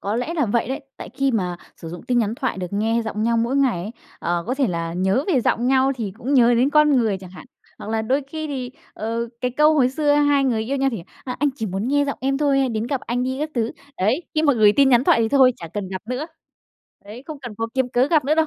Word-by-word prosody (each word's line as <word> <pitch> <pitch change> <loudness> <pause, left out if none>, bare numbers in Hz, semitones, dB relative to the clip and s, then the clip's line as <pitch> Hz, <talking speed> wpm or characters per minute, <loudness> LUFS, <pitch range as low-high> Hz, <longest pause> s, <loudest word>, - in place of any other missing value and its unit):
có 205 +3 -2
lẽ 275 +8 -2
là 295 -8 +1
vậy 235 +4 0
đấy, 270 +3 -3 0.2
tại - - -8
khi 275 0 +1
mà 180 -7 -1 0.2
sử 165 - -9
dụng 175 +1 -8
tin 245 -1 0
nhắn 220 -1 0
thoại 260 -7 -3
được 180 - -3
nghe 225 +3 +1
giọng 215 -1 -3
nhau 230 +1 +2
mỗi 235 +4 0
ngày 260 -10 +2
ấy, 205 - -5 0.3
ờ, 170 0 -2
có 255 - -1
thể 270 -1 +1
là 170 -3 -3
nhớ 190 +9 +1
về 275 -9 +3
giọng 235 +1 0
nhau 265 +1 +3
thì 210 -6 -4
cũng 275 +4 -1
nhớ 240 -2 +5
đến 255 +4 +2
con 300 0 +5
người 220 -6 +1
chẳng 185 -1 -12
hạn. 185 +7 -12 0.3
Hoặc 215 - -7
là 225 0 0
đôi 265 +6 0
khi 310 +1 -5
thì, 260 -4 -4 0.2
ờ, 230 +2 -3
cái 250 - 0
câu 300 +5 +4
hồi 265 -5 +4
xưa 290 +2 +1
hai 290 -1 +3
người 230 -4 +1
yêu 275 +5 -2
nhau 270 0 +1
thì: 205 - -5 0.2
"Ờ, 250 - -4
anh 290 - +2
chỉ 220 - -3
muốn 195 +4 -3
nghe 285 +1 +2
giọng 280 - -4
em 270 +1 0
thôi, 285 -2 +2
hãy 270 -1 +2
đến 225 -1 -2
gặp 270 0 -2
anh 245 +1 -2
đi" 260 +1 -2
các 305 - -2
thứ. 230 -1 -1 0.2
Đấy, 220 - +1
khi 310 - +2
mà 290 - +4
gửi 215 -4 +5
tin 275 -1 +5
nhắn 250 0 +4
thoại 230 - +4
thì 225 - +1
thôi, 260 0 +5
chả 165 - -9
cần 205 -3 -3
gặp 185 0 -6
nữa, 255 +5 -3 0.8
đấy, 215 +5 -10
không 310 -2 -7
cần 245 -5 -8
cố 225 - -1
kiếm 260 -1 +1
cớ 250 +2 +3
gặp 310 -3 +3
nữa 300 +3 +2
đâu. 320 0 +2
250 Hz, 285 wpm, -22 LUFS, 220-275 Hz, 0.8 s, nhớ